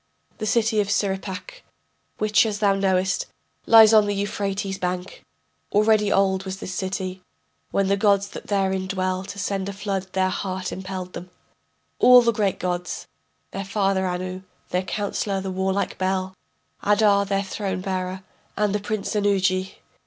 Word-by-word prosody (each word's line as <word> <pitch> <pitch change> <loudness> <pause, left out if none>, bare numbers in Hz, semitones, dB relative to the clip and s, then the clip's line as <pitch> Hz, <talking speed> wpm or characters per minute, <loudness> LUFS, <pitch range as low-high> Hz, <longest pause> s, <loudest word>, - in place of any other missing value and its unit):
The 215 - -2
city 220 -1 +2
Surippak, 200 - -3 0.6
which, 215 0 +3
as 210 -2 -2
thou 205 -2 +3
knowest, 190 -1 +1 0.4
Lies 225 -1 +8
on 215 -1 +6
the 205 - 0
Euphrates' 200 -1 -2
bank, 180 0 -4 0.5
Already 210 0 +3
old 190 -1 +2
was 190 0 -5
this 185 - -6
city 185 0 -3 0.5
When 195 -1 +1
the 200 +1 +2
gods 200 -1 +2
that - - -9
therein 190 -2 0
dwell 185 -1 -1
To 200 - -8
send 195 0 -2
a - - -5
flood 195 -1 -4
their 185 0 +2
heart 185 0 -3
impelled 185 -1 -6
them, 180 - -8 0.7
All 250 0 +8
the 235 - +3
great 205 -3 0
gods: 180 -1 -3 0.4
their 195 - -4
father 195 -1 0
Anu, 185 +1 -4 0.3
Their 180 - 0
counsellor 200 0 -2
the 190 0 -4
warlike 190 +1 -1
Bel, 190 0 -1 0.5
Adar 205 -1 +4
their 195 0 -1
throne 195 -1 -3
bearer 185 0 -3 0.3
and 210 -1 +1
the 210 - +1
Prince 210 +1 -3
Ennugi. 190 -2 +1
195 Hz, 150 wpm, -23 LUFS, 185-205 Hz, 0.7 s, Lies